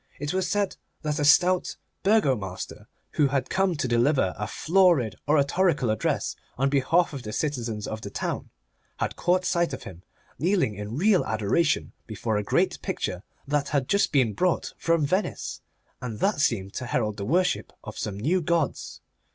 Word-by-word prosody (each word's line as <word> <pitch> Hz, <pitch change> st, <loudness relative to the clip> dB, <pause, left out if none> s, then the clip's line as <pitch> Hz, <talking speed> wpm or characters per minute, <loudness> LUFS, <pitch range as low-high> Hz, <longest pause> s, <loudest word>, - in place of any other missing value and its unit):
It 145 Hz, +4 st, -3 dB
was 190 Hz, 0 st, 0 dB
said 205 Hz, -1 st, 0 dB, 0.3 s
that 150 Hz, -1 st, -1 dB
a -, -, +1 dB
stout 180 Hz, +5 st, +4 dB, 0.3 s
Burgo 195 Hz, -10 st, +4 dB
master, 95 Hz, -4 st, -7 dB, 0.2 s
who 150 Hz, -, +3 dB
had 135 Hz, -1 st, -1 dB
come 190 Hz, -2 st, +2 dB
to 145 Hz, -, -1 dB
deliver 120 Hz, -4 st, +2 dB
a 105 Hz, +1 st, -4 dB
florid 170 Hz, -, +3 dB
oratorical 145 Hz, -2 st, +2 dB
address 110 Hz, -, -1 dB, 0.2 s
on 135 Hz, +2 st, +1 dB
behalf 155 Hz, +5 st, +2 dB
of 140 Hz, -, -5 dB
the 105 Hz, -, -6 dB
citizens 115 Hz, -5 st, -2 dB
of 110 Hz, 0 st, -5 dB
the 100 Hz, -, -6 dB
town, -, -, -4 dB, 0.5 s
had -, -, -2 dB
caught 180 Hz, +1 st, +1 dB
sight 170 Hz, -1 st, +1 dB
of -, -, -6 dB
him 90 Hz, -2 st, -10 dB, 0.4 s
kneeling 175 Hz, -, +2 dB
in 105 Hz, +4 st, -6 dB
real 190 Hz, +2 st, +4 dB
adoration 110 Hz, +10 st, +1 dB, 0.2 s
before 110 Hz, 0 st, -2 dB
a 105 Hz, -, -1 dB
great -, -, +1 dB
picture 90 Hz, -, -3 dB, 0.3 s
that 145 Hz, 0 st, 0 dB
had 140 Hz, -3 st, 0 dB
just 200 Hz, -, +2 dB
been 130 Hz, -7 st, +3 dB
brought 180 Hz, -, 0 dB
from 165 Hz, -3 st, +1 dB
Venice, 185 Hz, +8 st, -2 dB, 0.4 s
and 115 Hz, -4 st, -5 dB
that 200 Hz, -, +1 dB
seemed 100 Hz, -7 st, 0 dB
to 125 Hz, -, -4 dB
herald 110 Hz, -4 st, -1 dB
the 100 Hz, -, -4 dB
worship 180 Hz, -, +1 dB
of -, -, -8 dB
some 100 Hz, -1 st, -4 dB
new 170 Hz, -, +1 dB
gods. 165 Hz, -3 st, -1 dB
140 Hz, 175 wpm, -26 LUFS, 110-175 Hz, 0.5 s, stout